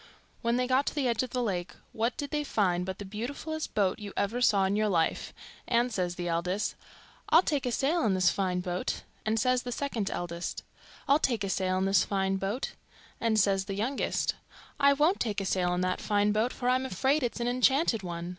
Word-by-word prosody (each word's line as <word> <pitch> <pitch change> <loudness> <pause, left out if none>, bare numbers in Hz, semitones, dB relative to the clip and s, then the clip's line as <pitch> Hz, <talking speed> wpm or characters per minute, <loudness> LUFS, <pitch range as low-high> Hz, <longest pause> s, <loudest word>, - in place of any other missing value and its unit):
When 235 0 +1
they 250 0 +1
got 260 +2 +2
to - - -2
the 280 -4 +1
edge 235 -2 +1
of 255 - -3
the 250 +1 -1
lake 180 -5 -3 0.2
what 230 +3 -1
did 285 -1 -4
they 295 -1 0
find 185 -9 0
but 190 0 -4
the 205 - -7
beautifullest 285 +10 -5
boat 195 -1 +1
you 205 -1 -7
ever 225 +5 0
saw 200 -5 +4
in 190 +1 +1
your 215 0 +2
life; 165 -4 0 0.4
and 240 0 +2
says 180 -3 -1
the 175 0 -4
eldest, 180 +5 -1 0.6
'I'll 330 +3 +6
take 285 -7 0
a - - 0
sail 290 +7 +1
in 200 -3 +2
this 185 -2 +4
fine 185 -2 -1
boat'; 180 0 -3 0.2
and 220 +1 +2
says 255 +2 +2
the 250 - -5
second 235 -6 -2
eldest, 175 0 -4 0.4
'I'll 285 +2 +5
take 235 -8 0
a 195 - -2
sail 185 -1 0
in 190 - +1
this 195 0 +4
fine 195 -1 0
boat'; 195 +7 -2 0.5
and 225 -2 +2
says 195 -1 +2
the 195 - -4
youngest, 240 +7 0 0.5
'I 280 0 +6
won't 305 +7 +2
take 215 -3 -1
a 195 - -3
sail 180 -1 +1
in 180 - -1
that 185 0 -1
fine 205 0 +2
boat, 220 +4 +1
for 245 - -4
I 250 - +5
am 260 +1 0
afraid 265 - +1
it's 245 -1 -2
an 240 - -1
enchanted 255 - +3
one. 170 -1 -5
215 Hz, 225 wpm, -29 LUFS, 190-255 Hz, 0.6 s, I'll